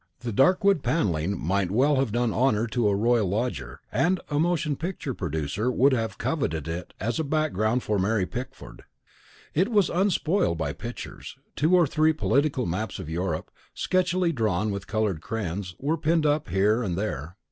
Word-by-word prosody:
The 120 -1 -3
dark 140 - +4
wood 195 -6 +4
panelling 100 - 0
might 95 +2 0
well 135 +8 +3
have 130 -4 +1
done 120 0 0
honour 115 -3 +2
to 120 -1 0
a 100 - +2
royal 115 0 +2
lodger, 100 - -3
and 180 +2 +2
a 145 - +1
motion 165 -3 +1
picture 160 -4 -4
producer 85 - -2
would 135 +3 +4
have 115 -3 -1
coveted 80 - -2
it 85 +2 -5
as 115 +7 -1
a - - +1
background 135 -6 0
for 105 -2 0
Mary 100 0 +1
Pickford. 125 +6 -8 0.7
It 185 +8 +2
was 205 -6 +3
unspoiled 180 - +1
by 75 -3 -2
pictures: 120 +3 -8 0.2
two 160 +5 +3
or 175 -2 +5
three 155 +2 +2
political 145 -3 +1
maps 95 +4 -3
of 85 -5 -7
Europe, 85 -1 -2 0.2
sketchily 180 -1 +1
drawn 110 - 0
with 100 -1 -5
coloured 105 -6 -1
crayons, 95 -3 -4
were 150 +4 -1
pinned 160 0 +1
up 150 -4 +1
here 105 +6 +2
and 90 -7 -2
there. 90 -5 -4
120 Hz, 175 wpm, -26 LUFS, 95-155 Hz, 0.7 s, or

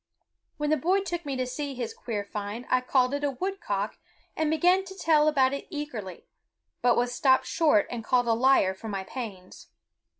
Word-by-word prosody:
When 295 0 -1
the 310 - +4
boy 365 +8 +2
took 345 -4 -4
me 275 - -2
to 255 0 -1
see 275 +2 -4
his 245 -2 -4
queer 210 -4 -4
find 210 +4 -5
I 255 - +4
called 255 0 +2
it 285 0 -2
a 290 - +2
woodcock 260 - -3 0.4
and 315 -1 0
began 355 +4 +3
to 380 0 -10
tell 310 -4 +3
about 270 -3 +3
it 280 - -5
eagerly, 250 - -6 0.6
but 245 -1 +3
was 245 0 +1
stopped 260 +1 +3
short 300 - +3
and 235 -2 -4
called 245 +1 +2
a 230 - +4
liar 235 -5 +4
for 190 +4 -10
my 195 -2 -3
pains. 190 -4 -8
260 Hz, 195 wpm, -27 LUFS, 225-300 Hz, 0.6 s, the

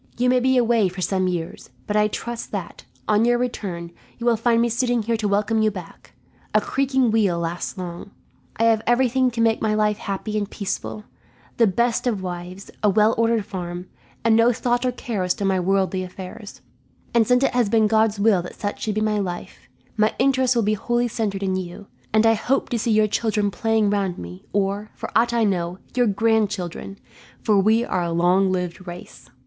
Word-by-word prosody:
You 250 +1 +2
may 255 - +4
be 260 +1 +2
away 230 -5 +3
for 185 +1 -10
some 185 0 0
years, 175 -2 -4 0.2
but 210 - -2
I 210 0 +4
trust 235 +2 -5
that, - - -6 0.2
on 215 +1 +3
your 240 +1 +3
return, 190 -9 -4 0.3
you 235 - -6
will 240 -1 +4
find 230 +1 +2
me 235 - +3
sitting 240 0 0
here 230 +2 0
to 215 -1 -1
welcome 210 +2 +1
you 215 - +3
back. 185 -5 -10 0.4
A - - +7
creaking 265 -3 +1
wheel 205 -6 +2
lasts 170 +2 -4
long. 175 +1 -6 0.5
I 225 - +1
have 225 -1 +4
everything 255 +1 +3
to 230 -1 -3
make 225 -1 +2
my 215 -1 +1
life 210 0 +1
happy 215 0 -3
and 205 -1 -4
peaceful 110 - -4 0.5
the 230 - +5
best 235 +5 +1
of 210 -6 -1
wives, 180 +1 -7
a 210 - +4
well 215 +3 +4
ordered 230 -2 +1
farm, 180 -1 -6 0.4
and 225 -1 +5
no 230 +2 +5
thought 245 +1 0
or - - +1
care 235 -4 -4
as 180 0 0
to 200 - -3
my 190 -1 +2
worldly 190 0 +1
affairs 185 +3 -9 0.5
and 235 -2 +3
since 250 +1 +3
it - - +2
has 245 -4 +2
been 220 -1 +3
God's 220 -1 +2
will 200 -3 +4
that 180 - -9
such 205 -1 -4
should 215 -2 -2
be 215 - 0
my 215 -1 +1
life, 180 -3 -6 0.3
my 215 0 +2
interest 260 -1 +2
will 235 - +2
be 210 +1 +2
wholly 240 +3 0
centred 210 -4 -2
in 190 -1 0
you; 185 +2 -6 0.3
and 215 +1 +3
I 225 - +6
hope 260 +5 0
to 240 - -1
see 230 - -1
your 215 0 +4
children 210 -1 0
playing 220 -1 +1
round 195 -3 -1
me 90 +1 -9
or, 200 +1 -1
for - - -8
ought 235 +1 +3
I 235 -1 +2
know, 180 -3 -1 0.2
your 245 -1 +3
grandchildren, 205 -3 0 0.5
for 210 -2 +3
we 220 +4 +3
are 185 - -1
a 170 -1 -2
long 180 +3 +3
lived 180 0 -3
race. 175 0 -10
215 Hz, 210 wpm, -22 LUFS, 190-230 Hz, 0.5 s, A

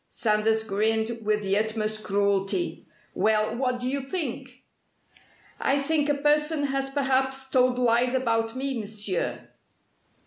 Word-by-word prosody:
Sanders 220 0 +1
grinned 220 +2 0
with 210 0 0
the 195 0 +1
utmost 215 0 -1
cruelty. 200 - 0 0.3
"Well, 215 0 +1
what 250 0 -1
do 250 - -3
you 275 +2 -1
think?" 265 -4 -4 1.0
"I 275 - +2
think 295 +1 0
a 290 - +3
person 300 +1 +2
has 270 -1 -1
perhaps 265 -1 0
told 255 -1 +2
lies 245 +1 +2
about 225 -2 0
me, 265 -1 -2
Monsieur!" 205 -3 -3
245 Hz, 130 wpm, -26 LUFS, 215-270 Hz, 1.0 s, a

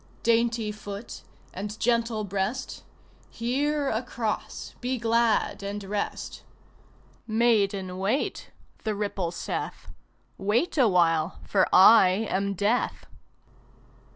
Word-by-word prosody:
Dainty 230 -1 +2
foot 205 +1 -8 0.3
and 205 +3 -6
gentle 230 -2 +1
breast 200 +6 -3 0.5
Here, 280 +5 -1
across, 230 -2 -3
be 255 +1 -1
glad 230 -2 +1
and 200 +1 -5
rest. 200 +1 -4 0.9
"Maiden, 205 -5 +1
wait," 205 +9 -1 0.3
the 215 -2 -1
ripple 200 -4 -2
saith. 170 - -5 0.5
"Wait 215 - +1
awhile, 175 - +3
for 190 -2 +2
I 190 +1 +7
am 200 +1 0
Death!" 210 +6 0
215 Hz, 95 wpm, -26 LUFS, 195-235 Hz, 0.9 s, I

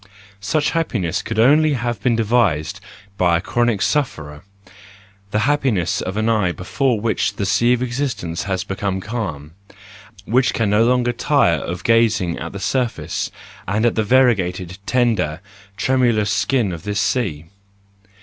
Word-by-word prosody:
Such 145 +10 0
happiness 105 - -1
could 110 - -5
only 150 +6 +4
have 120 -5 -3
been 120 +1 +2
devised 110 -9 +1 0.4
by 85 -2 +3
a - - -2
chronic 120 +1 0
sufferer, 80 - -2 0.9
the 105 +1 0
happiness 130 - +1
of 95 +2 -4
an 110 +1 0
eye 105 -6 +2
before 120 +7 -1
which 110 +1 -1
the 100 - -2
sea 105 +5 +2
of 125 0 0
existence 120 -10 -3
has 95 -2 -2
become 95 -1 -3
calm, 95 -9 -5 0.7
and - - -7
which 125 +1 +3
can 110 -3 0
no 105 +2 +4
longer 125 0 +2
tire 120 - +2
of 85 +3 -5
gazing 110 -7 +2
at 85 - -6
the 100 - -7
surface 125 +3 -2 0.4
and 110 +4 0
at 120 - +3
the 110 - 0
variegated, 100 -7 +1
tender, 110 -11 +1 0.4
tremulous 120 -6 +2
skin 110 +1 +1
of 85 -2 -6
this 105 +3 -2
sea. 85 - -1
110 Hz, 150 wpm, -20 LUFS, 95-125 Hz, 0.9 s, only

